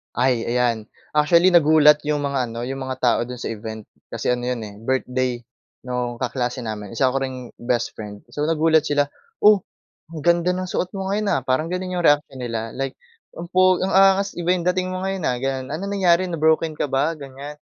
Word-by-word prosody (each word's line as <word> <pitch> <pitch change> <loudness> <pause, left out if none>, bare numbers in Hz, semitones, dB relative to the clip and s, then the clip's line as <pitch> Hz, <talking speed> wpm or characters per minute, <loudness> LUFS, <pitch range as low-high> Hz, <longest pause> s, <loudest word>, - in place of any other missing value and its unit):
Ay, 125 -2 +2
ayan. 120 -2 0 0.2
Actually, 170 +4 +4
nagulat 150 -2 +6
yung 150 0 0
mga 130 -4 -1
ano, 115 +1 -5
yung 135 0 -4
mga 130 0 -4
tao 120 -2 +3
do'n 125 +1 -6
sa - - -6
event 110 -1 -6 0.2
kasi - - -5
ano 120 - -5
'yon 125 0 -2
eh 100 - -10
birthday 130 0 0 0.5
nung 125 -1 -3
kaklase 125 0 -2
namin, 105 -2 -5
isa 130 +3 +3
ko 135 - 0
ring 130 -2 -6
best 120 0 -1
friend. 105 -1 -8
So, 145 - -2
nagulat 160 0 +3
sila, 145 -1 +1 0.3
"Oh, 210 -3 +5 0.5
ang 165 - -7
ganda 170 +1 +3
ng 185 0 -3
suot 180 - -2
mo 190 - -3
ngayon, 205 +1 0
ah." - - +2
parang 140 +6 0
gano'n 185 0 -3
yung 175 - -1
reaksyon 145 -2 +2
nila 115 -2 -4
like, 135 0 -4 0.4
"Ang 170 - -5
pogi 185 0 +4
ang - - -2
angas, 195 +1 +4
iba 175 0 -2
yung 180 -1 +1
dating 185 0 +1
mo 185 - -3
ngayon, 195 -1 -3
ah." 125 - -1
gano'n. 130 0 -2
"Anong 195 +7 -4
nangyari 185 -2 +3
na-broken 160 -1 +1
ka 145 - -3
ba?" 145 +5 +1
ganyan. 140 0 -9
145 Hz, 205 wpm, -22 LUFS, 125-175 Hz, 0.5 s, nagulat